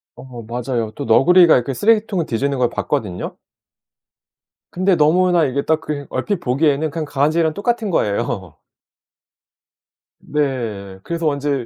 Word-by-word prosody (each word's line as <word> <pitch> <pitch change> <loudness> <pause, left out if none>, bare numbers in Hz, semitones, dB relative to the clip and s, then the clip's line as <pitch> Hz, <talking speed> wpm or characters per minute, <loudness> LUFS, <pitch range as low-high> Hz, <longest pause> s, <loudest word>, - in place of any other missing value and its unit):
어 125 -3 -10
맞아요. 120 -1 -3
또 - - -5
너구리가 170 +9 +6
이렇게 125 +2 0
쓰레기통을 210 - +1
뒤지는 135 +3 -1
걸 125 -2 +1
봤거든요. 105 -13 -3 1.3
근데 185 +1 +2
너무나 170 +2 +3
이게 140 +1 -1
딱 160 0 +1
그 145 -3 -5
얼핏 205 -4 -2
보기에는 145 +1 0
그냥 160 -1 -4
강아지랑 155 +3 +1
똑같은 225 0 -1
거예요. 100 - -2 1.6
네. 115 -10 -3
그래서 170 -1 -2
왠지 140 -3 -1
145 Hz, 300 characters per minute, -19 LUFS, 120-170 Hz, 1.6 s, 너구리가